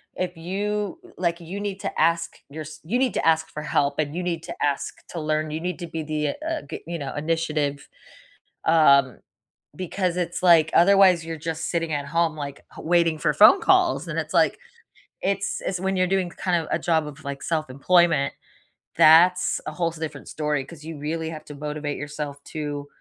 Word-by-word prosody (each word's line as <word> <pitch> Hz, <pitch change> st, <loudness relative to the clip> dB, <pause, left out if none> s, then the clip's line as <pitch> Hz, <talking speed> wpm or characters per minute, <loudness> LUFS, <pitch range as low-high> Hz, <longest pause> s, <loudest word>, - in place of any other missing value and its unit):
if 180 Hz, -2 st, -3 dB
you 200 Hz, +3 st, -3 dB, 0.2 s
like, 170 Hz, -1 st, 0 dB
you 180 Hz, +4 st, -6 dB
need 200 Hz, -1 st, -4 dB
to -, -, -4 dB
ask 170 Hz, +1 st, +1 dB
yours 155 Hz, +1 st, -8 dB
you 225 Hz, +10 st, 0 dB
need 260 Hz, -2 st, +1 dB
to -, -, 0 dB
ask 160 Hz, 0 st, +3 dB
for 150 Hz, -, -6 dB
help, 145 Hz, -1 st, 0 dB
and 150 Hz, 0 st, -1 dB
you 180 Hz, -, -2 dB
need 170 Hz, -2 st, -2 dB
to -, -, -6 dB
ask 140 Hz, -1 st, -2 dB
to 170 Hz, -, -5 dB
learn. 155 Hz, 0 st, -1 dB
You 155 Hz, -, -3 dB
need 180 Hz, 0 st, -3 dB
to 175 Hz, -, -5 dB
be 160 Hz, -1 st, -4 dB
the 150 Hz, -1 st, -1 dB
uh, 315 Hz, -, -3 dB, 0.3 s
you 170 Hz, 0 st, -3 dB
know, 140 Hz, -2 st, -5 dB
initiative, 150 Hz, -2 st, -1 dB, 0.8 s
um, 140 Hz, -6 st, +5 dB, 0.6 s
because 180 Hz, +1 st, -2 dB
it's 175 Hz, -1 st, -2 dB
like 165 Hz, -3 st, +6 dB
otherwise 185 Hz, -2 st, +5 dB
you're 165 Hz, 0 st, -4 dB
just 160 Hz, +1 st, -4 dB
sitting 165 Hz, -2 st, -1 dB
at 145 Hz, -1 st, -2 dB
home 165 Hz, +1 st, 0 dB
like 140 Hz, -2 st, -6 dB, 0.2 s
waiting 165 Hz, -1 st, +2 dB
for 150 Hz, 0 st, +1 dB
phone 215 Hz, -, +7 dB
calls. -, -, +3 dB
And -, -, -5 dB
it's -, -, -3 dB
like, -, -, +3 dB, 0.6 s
it's 195 Hz, 0 st, -1 dB
it's 185 Hz, -, -2 dB
when 190 Hz, +1 st, -1 dB
you're 185 Hz, 0 st, +2 dB
doing 190 Hz, -2 st, 0 dB
kind 180 Hz, 0 st, -1 dB
of 160 Hz, -, -6 dB
a -, -, +2 dB
job 160 Hz, -2 st, +1 dB
of 150 Hz, +1 st, -10 dB
like 140 Hz, 0 st, -5 dB
self-employment. 155 Hz, 0 st, +2 dB, 0.6 s
That's 180 Hz, +3 st, +6 dB
a -, -, -4 dB
whole 170 Hz, -2 st, -1 dB
different 160 Hz, -1 st, -7 dB
story 150 Hz, -2 st, -1 dB
'cause 155 Hz, -1 st, -13 dB
you 160 Hz, 0 st, -7 dB
really 160 Hz, +2 st, -3 dB
have 155 Hz, -1 st, -8 dB
to 150 Hz, -, -10 dB
motivate 150 Hz, 0 st, -4 dB
yourself 145 Hz, -1 st, -6 dB
to 145 Hz, -2 st, -5 dB
160 Hz, 190 wpm, -24 LUFS, 150-175 Hz, 0.8 s, phone